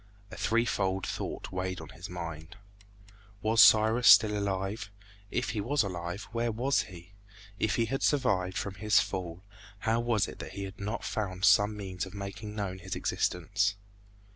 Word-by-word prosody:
A - - -7
threefold 100 -5 0
thought - - -5
weighed 95 0 -3
on 80 -2 -10
his 85 +4 -9
mind. 85 0 -7 0.9
Was 110 +1 +5
Cyrus 110 +3 +6
still 110 -2 +8
alive? 100 +1 -2 0.4
If 120 +3 -1
he 105 - -2
was 135 +5 +1
alive, 90 0 -4
where 115 0 0
was 125 +5 +1
he? 90 +1 -12 0.5
If 110 - +1
he 115 - +2
had 135 +4 -3
survived 95 -10 +1
from 100 - -3
his 105 +2 +3
fall, 90 -1 -4 0.4
how 115 +1 +1
was 115 -4 +1
it - - -10
that - - -7
he 100 - -5
had 95 0 -8
not 105 +3 -4
found 95 -2 -2
some 105 0 +5
means 95 -3 -4
of 95 - -12
making 100 +2 -6
known 95 -3 -3
his 95 +1 -5
existence? 95 +3 0
100 Hz, 165 wpm, -30 LUFS, 95-110 Hz, 0.9 s, still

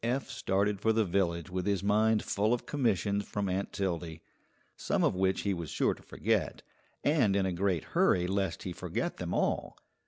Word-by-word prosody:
Eph 130 +3 -1
started 100 -4 0
for 110 +2 +2
the 110 -1 +2
village 85 -2 0
with 90 +1 -2
his 100 -2 +1
mind 110 +2 +3
full 105 +4 +1
of 120 - -9
commissions 105 - 0
from 100 0 -3
Aunt 95 +1 -2
Tildy, 85 -4 -3 0.5
some - - 0
of - - +3
which 95 0 +1
he 100 - 0
was 85 -3 -5
sure - - +1
to - - -15
forget, - - -1 0.4
and 130 -10 +3
in 100 -1 +2
a 95 - -1
great 90 -2 0
hurry 90 -1 +2
lest 95 -2 -1
he 90 - -4
forget - - -3
them - - -4
all. - - -1
100 Hz, 190 wpm, -31 LUFS, 90-105 Hz, 0.5 s, mind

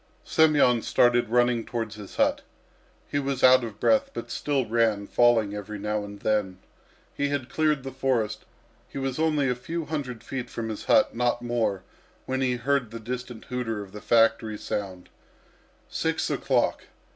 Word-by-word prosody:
Semyon 145 -7 +4
started 120 -1 +3
running 120 0 +2
towards 115 -3 -4
his 105 -2 -10
hut. - - +2 0.7
He 145 - -1
was 140 -2 -2
out 130 0 +7
of 110 -3 -7
breath, 275 0 +3
but - - -6
still 140 -3 0
ran, 110 -2 +1
falling 115 -3 +3
every 105 +1 -6
now 105 +1 -2
and 100 0 -9
then. 105 -4 0 0.6
He 145 0 0
had 140 -3 -2
cleared 155 -3 +1
the 135 - -5
forest; 120 -5 -1 0.5
he - - -8
was 135 0 -2
only 155 -3 +2
a 125 - +2
few 160 +7 -5
hundred 135 -7 -4
feet 130 -2 -5
from 115 -1 -4
his 110 - -6
hut, - - +4
not 120 0 0
more, 115 -6 -1 0.4
when 130 0 -2
he 125 -1 +1
heard 130 0 0
the 115 +1 -7
distant 120 0 -6
hooter 115 -4 -3
of 95 - -14
the 105 - -9
factory 115 -2 +3
sound 95 -4 -5 0.8
six - - -1
o'clock! - - 0
120 Hz, 170 wpm, -26 LUFS, 110-135 Hz, 0.8 s, out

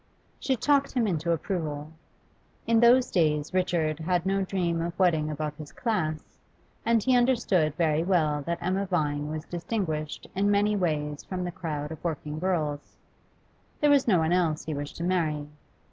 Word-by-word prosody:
She 265 - 0
talked 280 +3 +2
him 245 -3 +2
into 170 -4 0
approval. 155 -3 -3 0.7
In 230 0 +3
those 245 +2 +5
days 150 -3 +1
Richard 170 -4 0
had 175 +2 0
no 195 +1 +1
dream 175 -3 -1
of 170 +1 -4
wedding 160 -5 +2
above 150 0 -3
his 155 -2 -9
class, 170 -10 -3 0.4
and 230 -2 +2
he 260 -1 +3
understood 230 - +2
very 160 -2 +2
well 155 -5 +1
that 170 0 0
Emma 190 +2 0
Vine 150 -5 0
was 155 +1 -5
distinguished 170 -4 -3
in 200 +2 +1
many 205 +1 +3
ways 150 -6 -1
from 185 -1 -4
the 175 - -3
crowd 150 -4 -4
of 160 - -8
working 155 -2 -3
girls. 155 -5 -2 0.8
There 295 -1 +4
was 280 -3 +4
no 200 -6 +5
one 160 0 +1
else 165 -4 +1
he 155 - -3
wished 145 0 -5
to 170 - -4
marry. 160 -5 0
170 Hz, 170 wpm, -27 LUFS, 155-195 Hz, 0.8 s, those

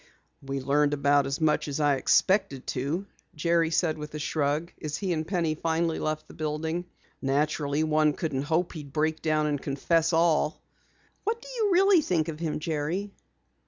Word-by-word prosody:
"We 135 0 -4
learned 145 +2 +2
about 140 0 +3
as 140 +2 -2
much 155 -1 +2
as 145 +1 -3
I 145 -2 +3
expected 190 -1 +2
to," 145 +9 -2 0.3
Jerry 165 +1 +2
said 160 -2 +1
with 150 0 -7
a - - -2
shrug, 150 +2 -1
as 150 -1 -3
he 190 -3 -1
and 155 -1 -3
Penny 170 -4 0
finally 165 +1 -1
left 155 0 -2
the - - -13
building. 160 +3 -3 0.4
"Naturally 145 +2 0
one 155 -1 +3
couldn't 145 -3 -2
hope 160 +5 0
he'd 150 -4 -8
break 155 0 0
down 155 -1 +1
and 145 -2 -1
confess 160 +4 +1
all." 160 -2 +2 0.6
"What 450 +2 -1
did - - -11
you 440 -4 +1
really 375 -1 +5
think 170 - 0
of 155 -1 -6
him, 165 -2 -2
Jerry?" 160 +6 -2
155 Hz, 175 wpm, -27 LUFS, 145-170 Hz, 0.6 s, really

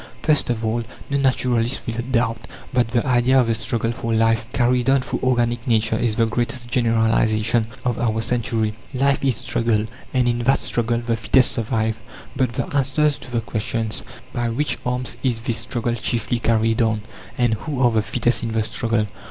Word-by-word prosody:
First 155 -4 +2
of 115 -2 -1
all, 115 +2 0 0.3
no 140 - +2
naturalist 125 -2 +1
will 115 - -3
doubt 120 -2 -1 0.3
that 125 -2 +3
the 120 +2 0
idea 130 0 +4
of 125 - +3
a - - +3
struggle 115 +1 -1
for 115 0 -4
life 115 0 +2
carried 125 +1 +2
on 135 0 +4
through - - -3
organic 120 -1 +1
nature 110 -2 +2
is 110 -1 +1
the 115 - +3
greatest 120 +2 -2
generalization 115 -2 +2 0.2
of 120 -2 0
our 110 -2 0
century. 110 -2 0 0.2
Life 140 +2 +2
is 135 -3 +2
struggle; 110 0 0 0.3
and 125 -2 +2
in 120 0 +1
that 130 +3 +3
struggle 120 0 -1
the 115 -1 +1
fittest 125 +3 +3
survive. 110 -1 -1 0.3
But 130 -3 0
the - - -1
answers 145 +2 +2
to - - -11
the 120 -1 0
questions, 110 0 -3 0.3
"By 120 -1 -1
which 140 +6 -1
arms 125 0 -2
is 120 -4 0
this 115 -1 -1
struggle 120 +1 -2
chiefly 120 +1 -1
carried 115 0 +2
on?" 110 -2 +1 0.3
and 120 -2 +2
"Who 135 +5 -4
are 120 - +5
the 110 -1 +2
fittest 120 +2 0
in 115 -1 -3
the 110 -1 +1
struggle?" 110 0 0
120 Hz, 185 wpm, -22 LUFS, 115-125 Hz, 0.3 s, are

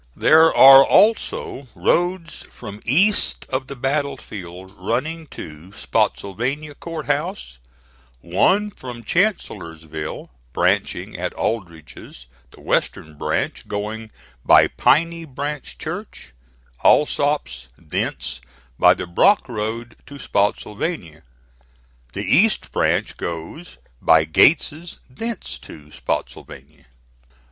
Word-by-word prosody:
There 160 +1 +6
are 135 0 +10
also 200 - +2
roads 175 -1 0
from 105 -3 -10
east 190 - +2
of 130 0 -3
the 140 - -7
battle 140 +2 -1
field 95 -3 -10
running 135 - -3
to 80 - -10
Spottsylvania 130 +12 -2
Court 165 +1 -7
House, 145 - -3 0.6
one 185 - +1
from 125 -8 -9
Chancellorsville, 80 - -3 0.2
branching - - 0
at - - -3
Aldrich's; 85 - -5 0.2
the - - -18
western 75 -1 -2
branch - - -3
going 110 +2 -5 0.3
by - - +6
Piney 165 +3 +2
Branch 145 -1 -6
Church, 60 - -7 0.5
Alsop's, 145 - +2
thence 65 +1 -4 0.4
by - - +6
the - - -5
Brock 90 - +3
Road 115 0 -5
to 140 - -10
Spottsylvania; 100 - -2 0.9
the - - -4
east - - +2
branch - - 0
goes 85 - -7 0.2
by 80 -1 +5
Gates's, 155 - +2
thence 180 - -6
to 75 -1 -13
Spottsylvania. 70 0 -6
120 Hz, 100 wpm, -21 LUFS, -, 0.9 s, are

